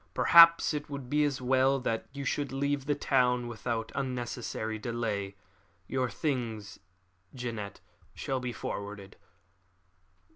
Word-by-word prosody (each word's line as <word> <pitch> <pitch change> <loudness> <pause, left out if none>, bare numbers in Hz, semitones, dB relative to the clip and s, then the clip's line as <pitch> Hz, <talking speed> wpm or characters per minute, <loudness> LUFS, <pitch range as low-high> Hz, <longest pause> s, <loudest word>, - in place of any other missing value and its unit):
Perhaps 170 -1 +7
it 150 0 -4
would 140 -3 -7
be 150 0 +3
as 135 -3 -2
well 130 +2 +3
that 115 -3 -2
you 140 0 -6
should 145 0 -1
leave 140 0 -1
the 145 - +2
town 125 -3 +2
without 115 -1 -3
unnecessary 120 -4 -3
delay. 105 -4 -3 0.5
Your 130 -1 -1
things, 115 - -3 0.6
Jeannette, 115 -5 -5 0.3
shall 135 -1 -2
be 125 -1 -3
forwarded." 100 -3 -6
125 Hz, 120 wpm, -30 LUFS, 115-140 Hz, 0.6 s, Perhaps